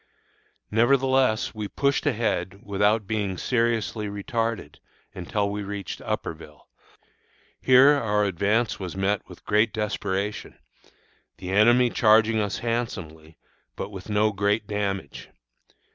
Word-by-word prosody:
Nevertheless, 130 Hz, 0 st, +2 dB
we 105 Hz, -2 st, -5 dB
pushed 140 Hz, +6 st, 0 dB
ahead 100 Hz, -3 st, -1 dB
without 105 Hz, +2 st, +1 dB
being 100 Hz, -3 st, -2 dB
seriously 115 Hz, -1 st, -1 dB
retarded 115 Hz, +3 st, -3 dB, 0.4 s
until 100 Hz, +3 st, -2 dB
we 105 Hz, 0 st, -4 dB
reached 100 Hz, -2 st, -6 dB
Upperville. 80 Hz, -2 st, -6 dB, 0.9 s
Here 130 Hz, +2 st, +6 dB
our 110 Hz, -7 st, +1 dB
advance 100 Hz, +5 st, 0 dB
was 95 Hz, -1 st, -6 dB
met 100 Hz, +1 st, 0 dB
with -, -, -14 dB
great 105 Hz, +2 st, +2 dB
desperation, 105 Hz, -1 st, -3 dB, 0.8 s
the 90 Hz, -1 st, -6 dB
enemy 120 Hz, +4 st, +4 dB
charging 110 Hz, 0 st, +4 dB
us 105 Hz, -2 st, -1 dB
handsomely, 80 Hz, -10 st, -4 dB, 0.4 s
but -, -, -5 dB
with 95 Hz, 0 st, -9 dB
no 105 Hz, +1 st, +2 dB
great 105 Hz, +2 st, 0 dB
damage. 100 Hz, -6 st, -4 dB
105 Hz, 115 wpm, -25 LUFS, 100-115 Hz, 0.9 s, Here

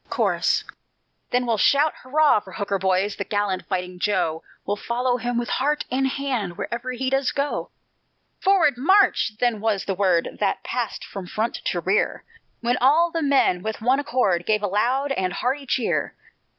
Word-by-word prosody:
Chorus -, -, +1 dB, 0.7 s
Then 250 Hz, 0 st, +1 dB
we'll 230 Hz, -3 st, 0 dB
shout 290 Hz, +8 st, +4 dB
hurrah 295 Hz, -1 st, +3 dB
for 190 Hz, -2 st, -14 dB
Hooker, 200 Hz, -2 st, -2 dB
boys, 190 Hz, +2 st, +1 dB
The 200 Hz, -, -2 dB
gallant 205 Hz, -2 st, -2 dB
fighting 180 Hz, -1 st, -3 dB
Joe; 165 Hz, -5 st, 0 dB, 0.2 s
We'll 205 Hz, -, -1 dB
follow 245 Hz, +3 st, -1 dB
him 245 Hz, 0 st, -2 dB
with 240 Hz, 0 st, -2 dB
heart 295 Hz, +3 st, 0 dB
and 265 Hz, +1 st, +1 dB
hand, 255 Hz, -10 st, -3 dB
Wherever 240 Hz, +2 st, -4 dB
he 260 Hz, +1 st, -2 dB
does 270 Hz, -1 st, +1 dB
go. 280 Hz, +1 st, -2 dB, 0.7 s
"Forward, 375 Hz, -9 st, +3 dB
March!" 380 Hz, -, +3 dB
then 240 Hz, -4 st, +1 dB
was 215 Hz, -3 st, 0 dB
the 195 Hz, -, -1 dB
word 185 Hz, -3 st, +1 dB
That 195 Hz, -2 st, 0 dB
passed 245 Hz, -3 st, -3 dB
from 195 Hz, -3 st, -8 dB
front 220 Hz, +5 st, -2 dB
to 175 Hz, -, -1 dB
rear, 190 Hz, +4 st, 0 dB, 0.4 s
When 240 Hz, +1 st, +1 dB
all 320 Hz, +7 st, +4 dB
the 330 Hz, -, -2 dB
men 275 Hz, -, +2 dB
with 220 Hz, +2 st, -4 dB
one 255 Hz, +5 st, +2 dB
accord 220 Hz, -11 st, 0 dB
Gave 215 Hz, -1 st, +1 dB
a -, -, +2 dB
loud 250 Hz, +8 st, 0 dB
and 185 Hz, -8 st, -1 dB
hearty 270 Hz, +3 st, -2 dB
cheer. 245 Hz, -1 st, -1 dB
235 Hz, 175 wpm, -23 LUFS, 200-270 Hz, 0.7 s, shout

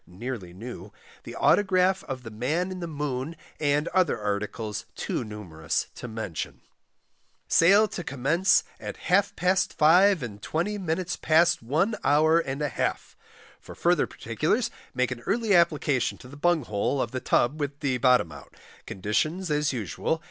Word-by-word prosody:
(nearly 100 Hz, -1 st, -6 dB
new), 100 Hz, 0 st, -9 dB, 0.3 s
the -, -, -8 dB
Autograph 190 Hz, -1 st, +3 dB
of 130 Hz, -2 st, -6 dB
the 115 Hz, -, -8 dB
Man 150 Hz, -, -1 dB
in 185 Hz, -, -6 dB
the 170 Hz, -, -4 dB
Moon, 145 Hz, -1 st, -3 dB, 0.2 s
and 145 Hz, +1 st, +1 dB
other 185 Hz, -10 st, +2 dB
articles, 105 Hz, +1 st, -3 dB
too -, -, -3 dB
numerous 95 Hz, -8 st, -4 dB
to -, -, -8 dB
mention. 110 Hz, -7 st, -5 dB, 0.9 s
Sale 200 Hz, +6 st, +5 dB
to 175 Hz, -, -5 dB
Commence 150 Hz, +7 st, +2 dB, 0.2 s
at -, -, -7 dB
half 195 Hz, +2 st, +1 dB
past 185 Hz, +1 st, +1 dB
5 180 Hz, +3 st, +5 dB
and 105 Hz, -4 st, -7 dB
20 200 Hz, -, -2 dB
minutes 180 Hz, 0 st, -2 dB
past 165 Hz, +2 st, +3 dB
One 155 Hz, -, +1 dB
hour 155 Hz, +3 st, +4 dB
and 145 Hz, -2 st, -3 dB
a 145 Hz, -, 0 dB
half. -, -, -3 dB, 0.4 s
For -, -, -12 dB
further -, -, +2 dB
particulars -, -, -1 dB, 0.2 s
make 125 Hz, 0 st, +1 dB
an 125 Hz, -, -4 dB
early 220 Hz, 0 st, +1 dB
application 155 Hz, -6 st, +2 dB
to -, -, -13 dB
the 135 Hz, -, -12 dB
Bung 170 Hz, +1 st, +2 dB
hole 110 Hz, +5 st, -1 dB
of 115 Hz, -, -1 dB
the 130 Hz, -, -3 dB
Tub 135 Hz, +6 st, +1 dB
with 145 Hz, -1 st, -3 dB
the 130 Hz, -3 st, 0 dB
bottom 125 Hz, -9 st, +4 dB
out. -, -, -13 dB, 0.3 s
Conditions 155 Hz, -, -1 dB
as 150 Hz, 0 st, +1 dB
usual. 115 Hz, -, -2 dB
145 Hz, 160 wpm, -26 LUFS, 120-175 Hz, 0.9 s, Sale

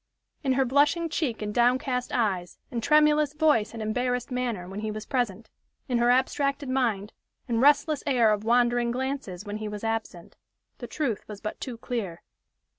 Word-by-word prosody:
In 265 Hz, -2 st, +2 dB
her 265 Hz, 0 st, +2 dB
blushing 290 Hz, +6 st, +2 dB
cheek 270 Hz, -9 st, -2 dB
and 210 Hz, 0 st, -3 dB
downcast 250 Hz, +1 st, +1 dB
eyes, 190 Hz, -7 st, -1 dB
and 235 Hz, -2 st, -2 dB
tremulous 300 Hz, +1 st, +4 dB
voice 300 Hz, -8 st, +2 dB
and 225 Hz, -1 st, -6 dB
embarrassed 245 Hz, +3 st, -1 dB
manner, 240 Hz, -8 st, -2 dB
when 195 Hz, +2 st, -6 dB
he 215 Hz, 0 st, -3 dB
was 215 Hz, 0 st, -5 dB
present, 230 Hz, -5 st, -2 dB, 0.4 s
in 245 Hz, -3 st, +1 dB
her 240 Hz, 0 st, +3 dB
abstracted 275 Hz, +2 st, +1 dB
mind, 225 Hz, -6 st, 0 dB, 0.3 s
and 230 Hz, -2 st, 0 dB
restless 290 Hz, +2 st, +4 dB
air 235 Hz, -6 st, +4 dB
of 210 Hz, 0 st, -3 dB
wandering 240 Hz, +1 st, +3 dB
glances 250 Hz, -7 st, -3 dB
when 205 Hz, 0 st, -4 dB
he 215 Hz, 0 st, -5 dB
was 210 Hz, 0 st, -6 dB
absent, 225 Hz, -6 st, -4 dB, 0.4 s
the -, -, -6 dB
truth 255 Hz, -9 st, -2 dB
was 210 Hz, -2 st, -8 dB
but 215 Hz, -, -6 dB
too 250 Hz, -4 st, -5 dB
clear. 215 Hz, -8 st, -4 dB
240 Hz, 175 wpm, -27 LUFS, 215-270 Hz, 0.4 s, tremulous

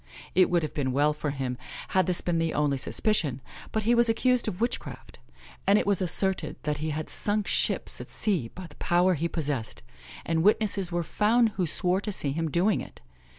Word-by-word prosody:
It 185 Hz, 0 st, +4 dB
would 175 Hz, -2 st, +2 dB
have 155 Hz, -, -4 dB
been 130 Hz, -3 st, -1 dB
well 145 Hz, +3 st, +3 dB
for 150 Hz, 0 st, -3 dB
him 130 Hz, -3 st, -3 dB, 0.3 s
had 185 Hz, 0 st, +2 dB
this 180 Hz, -1 st, 0 dB
been 170 Hz, -2 st, 0 dB
the 165 Hz, -1 st, -1 dB
only 145 Hz, -2 st, +1 dB
suspicion; 150 Hz, -, 0 dB, 0.3 s
but 220 Hz, -, -1 dB
he 235 Hz, +3 st, +3 dB
was 235 Hz, -1 st, +4 dB
accused 250 Hz, +2 st, +2 dB
of 185 Hz, -4 st, -3 dB
witchcraft; 235 Hz, +2 st, -4 dB, 0.5 s
and 200 Hz, +1 st, +6 dB
it -, -, +1 dB
was 200 Hz, -2 st, +1 dB
asserted 190 Hz, +2 st, +1 dB
that 150 Hz, -2 st, -2 dB
he 155 Hz, +1 st, -2 dB
had 155 Hz, +1 st, -3 dB
sunk 210 Hz, 0 st, 0 dB
ships -, -, 0 dB
at -, -, -10 dB
sea 180 Hz, -, -1 dB
by 185 Hz, +10 st, -10 dB
the -, -, -14 dB
power 180 Hz, +2 st, +2 dB
he 165 Hz, +1 st, -1 dB
possessed, 145 Hz, -10 st, -3 dB, 0.4 s
and 165 Hz, -1 st, +1 dB
witnesses 200 Hz, -1 st, +2 dB
were 170 Hz, 0 st, -1 dB
found 225 Hz, +7 st, +2 dB
who 190 Hz, -4 st, -2 dB
swore 180 Hz, +4 st, +2 dB
to 210 Hz, -, -3 dB
seeing 145 Hz, -8 st, -1 dB
him 165 Hz, +1 st, -2 dB
do 175 Hz, +6 st, +1 dB
it. 215 Hz, -, -2 dB
175 Hz, 205 wpm, -27 LUFS, 150-205 Hz, 0.5 s, and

